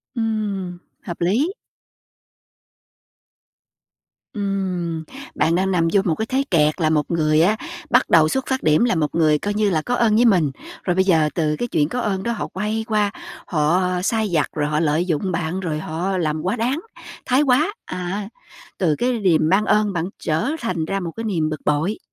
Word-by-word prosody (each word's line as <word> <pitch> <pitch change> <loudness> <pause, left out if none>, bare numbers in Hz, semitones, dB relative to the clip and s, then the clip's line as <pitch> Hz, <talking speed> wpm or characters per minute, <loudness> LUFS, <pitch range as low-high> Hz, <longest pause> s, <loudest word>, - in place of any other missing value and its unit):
Ừm, 205 -5 -2 0.2
hợp 175 - -6
lý. 250 - +1 2.8
Ừm, 185 -5 -2 0.3
bạn 165 +2 +2
đang 190 +1 +1
nằm 165 -2 +2
vô 200 - +5
một 165 -3 +1
cái 220 - -2
thế 265 +3 0
kẹt 155 0 +2
là 155 - +3
một 155 +1 0
người 155 -1 +3
á 205 +6 +4 0.3
bắt 250 +1 +3
đầu 160 -2 +6
xuất 265 0 -1
phát 265 0 -1
điểm 155 +7 +4
là 210 - +1
một 150 -2 -1
người 155 -2 +3
coi 205 0 -2
như 210 -1 +1
là 160 -4 +1
có 245 +9 -1
ơn 220 -3 +3
với 240 +2 +4
mình, 175 -10 +3 0.3
rồi 180 -2 0
bây 190 - +4
giờ 160 -5 +3
từ 155 -3 +1
cái 240 - -3
chuyện 150 -7 +1
có 250 - -2
ơn 195 -4 -1
đó 235 - -1
họ 230 - -3
quay 215 +3 -3
qua, 210 -2 +1 0.4
họ 160 +2 +2 0.2
sai 220 -1 0
vặt, 160 -3 +2
rồi 145 - -1
họ 150 0 0
lợi 160 +2 +1
dụng 180 +2 -1
bạn, 170 +2 -2
rồi 160 -5 -3
họ 175 +5 -2
làm 155 -2 -1
quá 185 +7 -1
đáng, 250 +6 -1 0.5
thái 260 +3 +3
quá. 300 +8 +2
À. 185 +3 -4 0.5
Từ 160 -5 +2
cái 245 +2 0
điềm 165 -5 +3
ban 205 +3 +3
ơn 210 -1 +2
bạn 170 0 -1
trở 160 - -1
thành 175 -8 -2
ra 195 +3 -2
một 170 -3 -4
cái 225 - -5
niềm 165 -8 0
bực 155 - -5
bội. 155 +8 0
185 Hz, 200 wpm, -21 LUFS, 160-215 Hz, 2.8 s, đầu